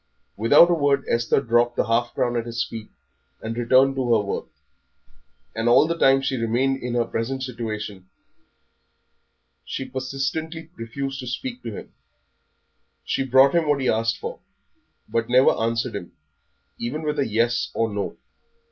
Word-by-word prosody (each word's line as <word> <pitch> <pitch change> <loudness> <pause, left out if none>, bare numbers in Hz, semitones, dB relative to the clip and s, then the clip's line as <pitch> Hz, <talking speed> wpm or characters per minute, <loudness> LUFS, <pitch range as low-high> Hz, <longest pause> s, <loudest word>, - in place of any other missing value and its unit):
Without 145 - +6
a - - +5
word 145 -3 +1
Esther 115 +3 +2
dropped 120 0 +2
the - - +1
half 115 +1 0
crown 120 -1 0
at 120 0 -2
his 115 0 -1
feet 110 -2 -8 0.5
and 115 +1 -5
returned 130 +3 +4
to 130 -3 -1
her - - +1
work; 100 - -3 1.1
and 115 +1 +1
all 120 - +6
the 170 +1 -1
time 135 -4 +4
she 135 -1 -1
remained 125 +4 0
in 120 0 -3
her 120 -1 +2
present 130 +4 -3
situation 105 -6 -6 1.5
she 135 - -5
persistently 140 +5 -4
refused 135 +4 -5
to 125 - -6
speak 125 0 -5
to 115 -3 -6
him; - - -11 1.1
she - - 0
brought 135 +1 +5
him 165 -3 +2
what 145 -1 +2
he 130 - 0
asked 115 0 +1
for, - - -6 0.7
but 115 0 -1
never 125 +2 +6
answered 115 +1 -1
him, 90 -4 -7 0.7
even 145 +7 -3
with 150 -1 -2
a 140 - +1
Yes 115 +2 +1
or 115 - +1
No. 100 -1 -3
120 Hz, 160 wpm, -23 LUFS, 115-135 Hz, 1.5 s, Without